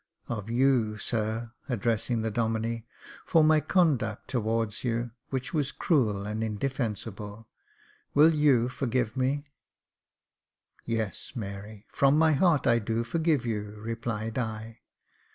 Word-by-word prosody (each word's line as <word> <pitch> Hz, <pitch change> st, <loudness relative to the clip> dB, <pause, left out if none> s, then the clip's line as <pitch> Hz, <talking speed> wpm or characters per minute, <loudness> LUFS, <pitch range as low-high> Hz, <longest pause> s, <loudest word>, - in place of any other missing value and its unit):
Of 110 Hz, -2 st, -4 dB
you, 120 Hz, -3 st, +2 dB
sir," 110 Hz, +2 st, -2 dB, 0.2 s
addressing 115 Hz, 0 st, 0 dB
the 110 Hz, -, -1 dB
Domine, 115 Hz, +1 st, -1 dB, 0.2 s
" -, -, -17 dB
for 165 Hz, -3 st, +5 dB
my 155 Hz, 0 st, +5 dB
conduct 145 Hz, -, +1 dB
towards 115 Hz, -2 st, -1 dB
you, 120 Hz, -1 st, -1 dB, 0.2 s
which 130 Hz, +2 st, -3 dB
was 150 Hz, -3 st, 0 dB
cruel 110 Hz, -, +1 dB
and 105 Hz, +2 st, -2 dB
indefensible, 110 Hz, -2 st, -3 dB, 0.3 s
— -, -, -32 dB
will 155 Hz, +3 st, +7 dB
you 140 Hz, -6 st, +4 dB
forgive 125 Hz, -2 st, -1 dB
me? 135 Hz, +3 st, 0 dB, 0.5 s
" -, -, -63 dB
" -, -, -63 dB, 0.3 s
Yes, 110 Hz, -4 st, -3 dB
Mary, 100 Hz, -1 st, -7 dB
from 140 Hz, +1 st, +4 dB
my 160 Hz, 0 st, +5 dB
heart, 155 Hz, -1 st, +3 dB
I 120 Hz, -2 st, +4 dB
do 115 Hz, +1 st, -1 dB
forgive 155 Hz, +1 st, +1 dB
you," 105 Hz, -2 st, -3 dB
replied 115 Hz, +1 st, -3 dB
I. 110 Hz, -1 st, -4 dB
115 Hz, 135 wpm, -28 LUFS, 110-135 Hz, 0.5 s, will